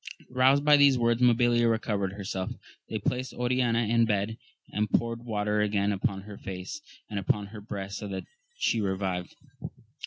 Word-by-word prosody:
Eoused 135 +3 +4
by 150 0 +8
these 140 -2 +6
words 120 0 +2
Mabilia 120 -1 +4
recovered 105 -4 -1
herself; 95 -2 -4 0.4
they - - -2
placed 130 +1 -2
Oriana 125 -1 +1
in 115 +1 +3
bed, 105 0 0 0.4
and 105 +1 0
poured 115 0 0
water 105 -2 0
again 105 -1 +1
upon 95 -1 -1
her 105 0 -9
face 95 +10 -6 0.3
and 105 -2 -3
upon 100 +2 0
her 105 +1 -10
breast, 100 -1 -5
so 105 - -5
that 95 -1 -5 0.3
she 115 - +1
revived. 95 -2 -2
105 Hz, 160 wpm, -28 LUFS, 100-120 Hz, 0.4 s, by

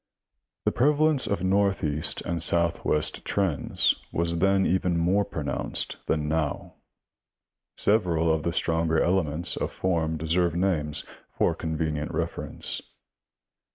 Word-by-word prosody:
The - - +3
prevalence 150 +2 +2
of 100 - -1
northeast 95 -6 +1
and 85 -1 -2
southwest 85 -2 +1
trends 95 -8 +1 0.2
was 85 0 -1
then 95 +1 +3
even 90 -1 +1
more 90 +5 +2
pronounced 80 -7 -3
than 75 -1 0
now. 75 -1 -2 1.0
Several 85 -6 +3
of 80 - -1
the 85 - -1
stronger 80 -1 +1
elements 85 -2 +1
of - - -3
form 80 -3 -1
deserve 85 +2 0
names, 85 -5 0 0.3
for - - +2
convenient 80 -2 -3
reference. - - -1
85 Hz, 115 wpm, -26 LUFS, 80-95 Hz, 1.0 s, The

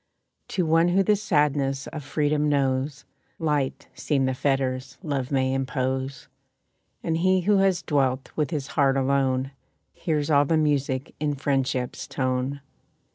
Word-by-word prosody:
To 180 - -1
one 165 +2 +4
who 190 +2 +3
the 210 +2 +3
sadness 145 -8 +1
of 155 - -7
freedom 150 +1 +1
knows, 135 0 0 0.3
Light 150 -4 -1
seem 140 -3 0
the 130 - 0
fetters 130 -1 -1
love 140 -5 -2
may 130 -1 +1
impose. 130 0 -2 0.8
And 160 -1 0
he 185 +2 +3
who 205 +3 +3
has 195 -2 +2
dwelt 135 -3 0
with 150 -2 0
his 150 -5 -3
heart 135 -2 +2
alone, 135 -1 +1 0.4
Hears 150 -2 -1
all 145 0 +5
the 160 +3 +2
music 140 -3 0
in 145 -1 0
friendship's 130 -2 -1
tone. 130 +1 -2
140 Hz, 140 wpm, -25 LUFS, 130-155 Hz, 0.8 s, all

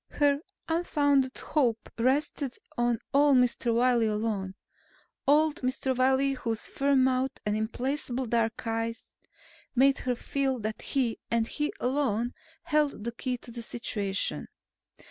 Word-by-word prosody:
Her 285 -1 +2 0.3
unfounded 285 -5 +2
hope 245 -7 0
rested 265 +2 0 0.2
on 240 -1 +1 0.2
old 285 -1 +5
Mr. 245 -1 +2
Wiley 235 -1 +3
alone; 210 -3 -2 0.7
old 300 +1 +4
Mr. 260 0 -1
Wiley 265 +2 +3
whose 230 -4 -3
firm 275 -1 +2
mouth 260 0 +1
and 210 0 +1
implacable 250 +4 -2
dark 230 0 0
eyes 225 +1 -3 0.6
made 270 +2 +4
her 250 -1 -1
feel 270 +1 -1
that 215 +1 -4
he, 250 -5 0
and 230 -1 +2
he 295 +4 -2
alone, 245 -3 0 0.3
held 300 -8 +1
the 235 - -2
key 250 +2 -3
to 240 - -12
the 235 0 -6
situation. 205 -4 -1
255 Hz, 130 wpm, -28 LUFS, 230-275 Hz, 0.7 s, old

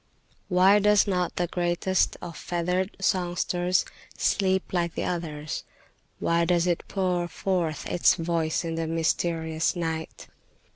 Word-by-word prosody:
"Why 190 +2 +5
does 210 0 +4
not 180 -3 -1
the 175 - +1
greatest 175 +2 0
of 170 -2 -7
feathered 180 +2 -2
songsters 180 -1 +1 0.3
sleep 190 -2 +1
like 170 -2 0
the - - -2
others? 155 -4 -4 0.5
Why 170 0 +1
does 170 0 +2
it 175 -2 0
pour 180 -3 0
forth 175 -3 -2
its 175 - +3
voice 165 0 -1
in 165 - -2
the 165 0 -2
mysterious 160 0 0
night? 160 -2 -4
175 Hz, 130 wpm, -26 LUFS, 165-185 Hz, 0.5 s, Why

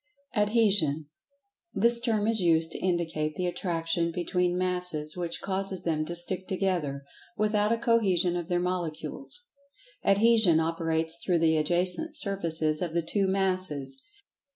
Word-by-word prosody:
Adhesion: 205 -9 +3 0.7
This 235 +4 +5
term 225 -3 0
is 225 -2 +3
used 165 -2 +2
to - - -5
indicate 165 -4 -1
the 180 - -2
attraction 170 -1 -1
between 180 +1 -1
Masses 180 -4 0
which 175 -2 -4
causes 190 -1 -3
them 155 -2 -1
to 170 - -4
"stick 180 +2 -1
together" 175 -8 -2 0.3
without 210 0 +1
a 230 - +2
cohesion 200 -7 +2
of 175 0 -4
their 175 -1 +1
Molecules. 180 - -4 0.6
Adhesion 205 -4 +4
operates 165 0 -1
through 180 -2 +1
the 160 -1 +3
adjacent 180 - 0
surfaces 165 - 0
of 170 -2 -3
the 170 - +1
two 195 +4 0
Masses. 185 - -1
180 Hz, 135 wpm, -28 LUFS, 165-195 Hz, 0.7 s, This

